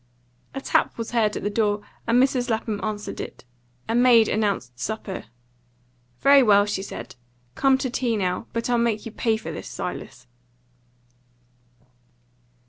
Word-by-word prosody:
A 270 - -3
tap - - +1
was 230 -1 -4
heard 220 -3 +1
at - - -6
the 205 - 0
door, 205 -1 +1 0.2
and 230 +2 +4
Mrs. 255 -1 +2
Lapham 220 -2 -1
answered 210 -1 -4
it. - - -9 0.4
A 225 - -1
maid 240 -2 +6
announced 200 - -1
supper. 190 - -4 1.0
"Very 280 0 +7
well," 205 -4 +5
she 205 -2 -2
said, 195 - -8 0.4
"come 270 - +3
to 265 - -2
tea 240 -3 0
now. 185 +1 -1
But 230 0 -2
I'll 240 -1 +2
make 230 -2 0
you 225 - -6
pay 225 0 0
for 220 - -7
this, - - -7
Silas." 130 - -6
220 Hz, 150 wpm, -24 LUFS, 205-240 Hz, 1.0 s, Very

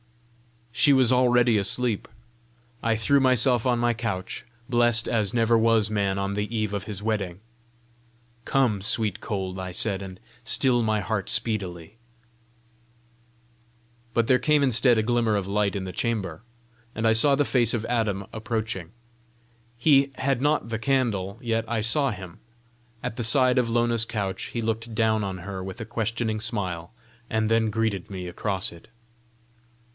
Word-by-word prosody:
She 140 +5 +4
was 130 -2 +4
already 125 -3 +4
asleep. 110 +2 0 0.7
I 115 -1 +1
threw 140 +6 +3
myself 130 -2 +3
on 125 -1 +2
my 120 0 +1
couch 110 -5 -4 0.2
blessed 120 -2 +3
as 110 -4 0
never 115 -1 +2
was 110 -1 +3
man 100 -2 0
on 100 0 -2
the 105 +3 -3
eve 105 -2 -1
of 100 -2 -3
his 105 -2 -6
wedding. 100 -5 -2 1.1
"Come, 120 -8 +1
sweet 105 -1 0
cold," 95 -2 -4
I 95 -1 -5
said, 100 0 0
"and 95 -1 -9 0.2
still 120 +1 +3
my 110 -1 +1
heart 100 -2 -2
speedily." 100 -4 -1 2.2
But 115 - +3
there 125 +1 +3
came 150 +2 +3
instead 125 -2 +4
a 110 - +2
glimmer 115 -2 +1
of 100 -2 -1
light 100 0 0
in 100 - -3
the 95 - -5
chamber, 105 0 -3 0.5
and 115 - -2
I 110 - +5
saw 140 +5 +4
the 145 +1 +1
face 120 -4 +2
of 110 - -3
Adam 110 -5 -1
approaching. 110 -5 -4 0.9
He 140 +1 +4
had 135 -2 -1
not 145 -4 +1
the 110 -1 -3
candle, 110 -6 0
yet 115 -1 0
I 115 -2 0
saw 135 +6 +2
him. 95 -6 -8 0.6
At 110 - -4
the 120 - -2
side 125 +2 +4
of 120 -2 0
Lona's 120 -1 +1
couch, 100 -4 -3
he 115 - -4
looked 115 +1 -3
down 110 -1 +2
on 95 -2 -4
her 95 +1 -6
with 95 0 -7
a 115 - -5
questioning 115 -1 -2
smile, 95 -7 -3 0.4
and 110 0 0
then 115 -1 +3
greeted 110 -4 -2
me 95 -2 -6
across 95 +1 -2
it. 85 - -15
110 Hz, 160 wpm, -25 LUFS, 100-120 Hz, 2.2 s, I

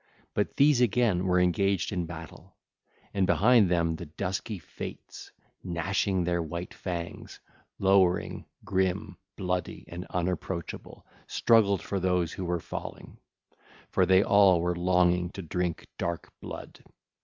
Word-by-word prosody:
But - - -1
these 140 -3 +5
again 110 -6 +2
were 90 0 +3
engaged 95 +1 +1
in 90 -4 -2
battle: 80 -2 -10 0.6
and 95 -2 +2
behind 110 0 +5
them 85 -2 +1
the 85 - -8
dusky 95 +6 -3
Fates, 85 - -9 0.3
gnashing 95 +2 0
their 85 0 0
white 85 +2 -5
fangs, 85 -2 -6 0.4
lowering, 95 -2 +2 0.2
grim, 95 0 -1 0.2
bloody, 90 -3 -3
and 90 +2 -7
unapproachable, 90 -1 -4 0.2
struggled 100 -5 +3
for 100 - -2
those 90 -2 +1
who 95 - -5
were 90 0 -1
falling, - - -8 0.7
for 95 - +3
they 95 +1 +6
all 100 -4 +5
were 90 +1 0
longing 90 0 +2
to 95 - -6
drink 90 0 -2
dark 85 -1 -3
blood. - - -9
90 Hz, 130 wpm, -28 LUFS, 85-95 Hz, 0.7 s, they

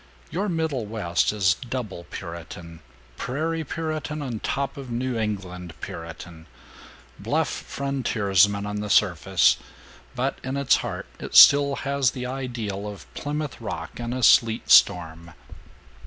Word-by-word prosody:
Your 200 +4 -1
Middlewest 115 - -1
is 95 -4 +3
double 115 -5 -6
Puritan 85 -1 -8 0.4
prairie 160 +5 -2
Puritan 155 -1 -4
on 120 -5 -4
top 140 +5 -2
of 135 -2 -8
New 125 +1 -2
England 90 -6 -4
Puritan; 85 0 -9 0.7
bluff - - 0
frontiersman 100 -8 0
on 105 0 -4
the 105 0 -4
surface, 95 -2 +3 0.6
but - - -2
in 130 +1 -3
its 140 -1 +4
heart - - -5
it - - -7
still 140 -1 +8
has 140 -2 +2
the 125 +2 -6
ideal 120 -6 -4
of 100 -1 -8
Plymouth 150 -3 -4
Rock 85 -5 -6
in 120 0 -4
a 130 0 -3
sleet 115 -1 +4
storm. 85 -3 +4
115 Hz, 125 wpm, -24 LUFS, 95-140 Hz, 0.7 s, still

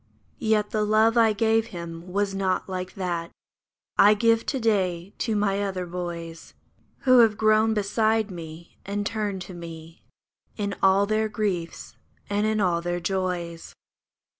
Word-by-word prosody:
Yet 215 -2 +1
the 215 -1 0
love 215 +2 +3
I 225 -2 +5
gave 225 +1 +2
him 170 -3 -8
was 200 +1 0
not 195 -1 -1
like 185 -1 -5
that 175 -3 -3 0.7
I 210 +1 +7
give 230 +1 +2
to 270 - -1
day 190 -5 0
to 225 -3 -1
my 200 -1 +1
other 190 -2 -2
boys. 170 -2 -7 0.5
Who 255 -2 +6
have 220 -3 +5
grown 215 +1 +3
beside 215 +1 +1
me, 165 -1 -10
and 205 +1 -3
turned 205 -4 -2
to 185 - -10
me 165 -1 -10 0.5
In 200 -2 -2
all 195 +1 +4
their 215 +1 0
griefs 195 -6 -3 0.3
and 205 +1 +1
in 215 0 0
all 175 -4 +1
their 175 0 -2
joys. 175 -2 -3
200 Hz, 150 wpm, -25 LUFS, 175-215 Hz, 0.7 s, I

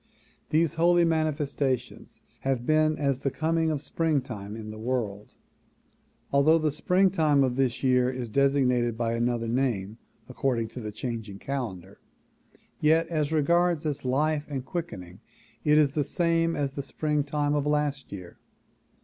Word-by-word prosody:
These 160 0 +2
holy 175 0 +5
manifestations 145 -5 -2 0.2
have 130 -3 -1
been 155 +1 +3
as 140 -3 0
the 135 - -1
coming 160 +3 0
of 150 -2 -2
springtime 130 -12 -2
in 110 -1 -7
the 110 - -9
world. 110 -4 -3 1.0
Although 140 +4 +5
the 155 -2 0
springtime 160 -3 +3
of 125 -2 0
this 130 -2 0
year 125 -1 +3
is 125 -3 -5
designated 125 -3 +2
by 115 -1 0
another 120 0 0
name 115 -4 -1 0.3
according 125 -3 -1
to 125 - -8
the 105 -2 -5
changing 110 -2 -5
calendar, 100 -8 -5 0.8
yet 160 +2 +3
as 155 -3 -1
regards 170 +1 +2
its 150 -3 -2
life 145 +4 0
and 135 -3 -4
quickening 95 - -6 0.4
it 150 0 +4
is 150 -3 +4
the 150 +1 0
same 165 +1 +1
as 140 -2 -1
the 140 - -4
springtime 145 0 -1
of 145 -1 0
last 150 -2 -1
year. 90 -3 -9
140 Hz, 145 wpm, -27 LUFS, 120-155 Hz, 1.0 s, holy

